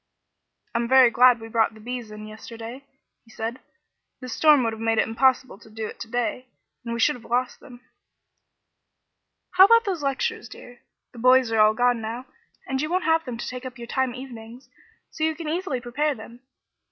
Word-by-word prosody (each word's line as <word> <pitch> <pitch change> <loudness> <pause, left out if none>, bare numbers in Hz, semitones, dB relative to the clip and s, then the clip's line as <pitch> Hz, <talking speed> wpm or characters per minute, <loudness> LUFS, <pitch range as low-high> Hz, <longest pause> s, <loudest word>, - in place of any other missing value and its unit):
"I'm 235 0 0
very 260 -1 +6
glad 250 0 +5
we 225 - -9
brought 225 0 +1
the - - -14
bees 240 0 -6
in 215 0 -9
yesterday," 230 +4 -10 0.4
he 230 - -24
said. 225 +3 -5 0.6
"This 255 -3 -7
storm 300 0 +5
would 225 -1 -1
have 220 - -9
made 225 0 0
it - - +2
impossible 255 -1 +1
to 220 - -17
do 220 0 -6
it - - -9
to - - -7
day, 245 +2 -2 0.4
and 235 -1 -4
we - - -4
should 300 - +3
have 240 - -13
lost 245 +1 -1
them." 245 -3 -14 1.7
"How 370 +1 +8
about 460 +2 +5
those 370 -6 -2
lectures, 270 -4 -2
dear? 245 +2 -13 0.3
The 240 - -12
'boys' 255 0 +4
are 225 - +1
all 215 0 +5
gone 245 0 +2
now, 230 +3 -5 0.4
and 265 0 -1
you 305 - -2
won't 365 +1 0
have 325 -1 +2
them 245 -2 -5
to 240 - -6
take 250 0 -6
up 255 0 -8
your 235 - -8
time 260 0 -1
evenings, 245 -1 -10 0.4
so 310 - -5
you 315 0 +1
can 325 0 -7
easily 315 -4 -2
prepare 275 +5 -1
them. 230 +2 -12
245 Hz, 200 wpm, -24 LUFS, 225-265 Hz, 1.7 s, How